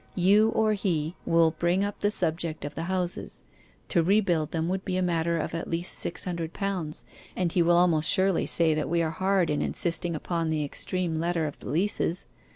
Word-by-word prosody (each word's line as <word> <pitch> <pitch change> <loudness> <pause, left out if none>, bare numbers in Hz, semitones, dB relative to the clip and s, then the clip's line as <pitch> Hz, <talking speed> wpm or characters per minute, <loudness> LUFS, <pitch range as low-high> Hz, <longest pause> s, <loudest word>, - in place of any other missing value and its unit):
You 200 +4 +4
or 215 -1 +3
he 175 -5 -1
will 165 -1 +4
bring 175 +4 0
up 205 - -5
the 205 - +3
subject 165 -5 -1
of 145 - -5
the 165 - -4
houses. 185 -2 -2 0.5
To 175 - +3
rebuild 175 -4 +2
them 165 0 -2
would 190 +1 -2
be 185 -1 -2
a - - +1
matter 170 -1 0
of 160 - -3
at 165 - -4
least 170 +2 -2
six 175 - -4
hundred 170 -3 -4
pounds, 185 -6 -3 0.3
and 180 -2 0
he 175 - +2
will 170 +1 +4
almost 165 -3 +3
surely 190 -2 +2
say 165 -2 +3
that 155 -1 -2
we 170 0 +1
are 160 - -1
hard 190 -2 +1
in 150 - 0
insisting 170 0 +1
upon 165 +1 -2
the 155 -2 0
extreme 170 +2 -2
letter 170 -1 0
of 150 - -6
the - - -8
leases. 175 +2 0
170 Hz, 205 wpm, -27 LUFS, 160-185 Hz, 0.5 s, You